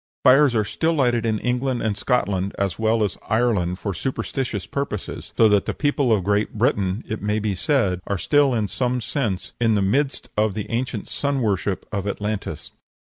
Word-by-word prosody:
Fires 135 0 +6
are 110 -2 +2
still 165 +9 0
lighted 120 -6 +2
in 110 -1 +1
England 125 +2 -1
and 110 -2 0
Scotland 100 -4 0
as 100 -2 -1
well 110 0 +2
as 100 - -2
Ireland 105 -6 +1
for 100 0 -3
superstitious 120 0 -3
purposes; 140 -8 -4
so 115 - +7
that 105 -1 +2
the - - -2
people 145 -4 +1
of 105 -4 +3
Great 105 +3 0
Britain, 105 -3 +1
it 110 - -4
may 105 +1 0
be 105 -1 -1
said, 95 - +1
are 100 - 0
still 145 +7 +3
in 110 -3 0
some 125 +3 -1
sense 110 -6 -2
in 115 -2 +3
the 100 - +2
midst 135 +8 0
of 105 -2 +1
the 105 - -4
ancient 115 -2 -2
sun 140 -1 -1
worship 100 -4 -1
of 100 -1 -2
Atlantis. 100 -6 -4
110 Hz, 190 wpm, -23 LUFS, 100-125 Hz, -, so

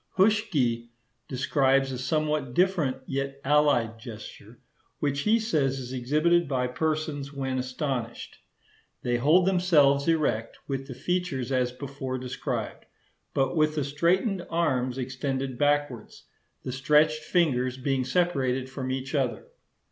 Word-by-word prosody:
Huschke 160 - +2 0.4
describes 135 0 +2
a 125 - -4
somewhat 150 -1 -1
different 175 -7 +2
yet 135 +1 -3
allied 135 -6 +3
gesture, 110 -1 -10 0.4
which 140 -1 -1
he 215 +9 +3
says 145 - 0
is 130 -1 -6
exhibited 155 +7 +2
by 130 -2 0
persons 150 +1 -2
when 135 -2 -2
astonished. 125 -2 -4 0.6
They 120 0 +1
hold 155 +9 +4
themselves 160 -7 +4
erect, 150 -9 0
with 135 -1 -3
the 130 - -7
features 175 -7 -2
as 125 -1 +1
before 135 0 -5
described, 125 0 -4 0.5
but 135 +4 +1
with 155 -1 +2
the 150 - 0
straightened 175 - +1
arms 130 -7 0
extended 130 0 -3
backwards—the 145 -3 -3
stretched 150 +4 +3
fingers 130 -8 +1
being 130 0 0
separated 130 -4 0
from 130 -1 -4
each 130 +1 -3
other. 135 -5 -1
135 Hz, 125 wpm, -27 LUFS, 130-155 Hz, 0.6 s, hold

